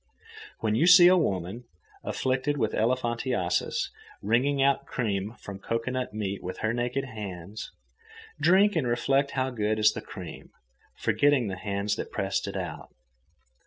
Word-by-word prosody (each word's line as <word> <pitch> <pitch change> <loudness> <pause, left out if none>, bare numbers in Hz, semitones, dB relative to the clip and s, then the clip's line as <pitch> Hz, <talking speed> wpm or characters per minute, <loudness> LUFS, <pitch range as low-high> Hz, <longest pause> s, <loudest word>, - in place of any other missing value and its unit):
When 110 -1 +1
you 135 +10 +3
see 180 0 +9
a 185 - +6
woman, 100 - -1 0.4
afflicted 130 +3 -1
with 110 -5 0
elephantiasis 120 -5 0 0.3
wringing 125 +7 +2
out 135 0 +2
cream 105 -2 -2
from 100 -1 -9
cocoanut 125 +4 -2
meat 100 -2 -3
with 90 - -6
her 110 - +1
naked 125 +3 -1
hands, 105 -4 -7 0.7
drink 195 +3 +4
and 150 -6 +1
reflect 135 +4 +1
how 130 0 0
good 110 -2 0
is 110 0 +4
the - - -5
cream, - - -9 0.5
forgetting 140 -6 +2
the 95 - -3
hands 100 +2 -2
that - - -5
pressed - - -1
it - - -4
out. - - -6
120 Hz, 145 wpm, -27 LUFS, 105-135 Hz, 0.7 s, see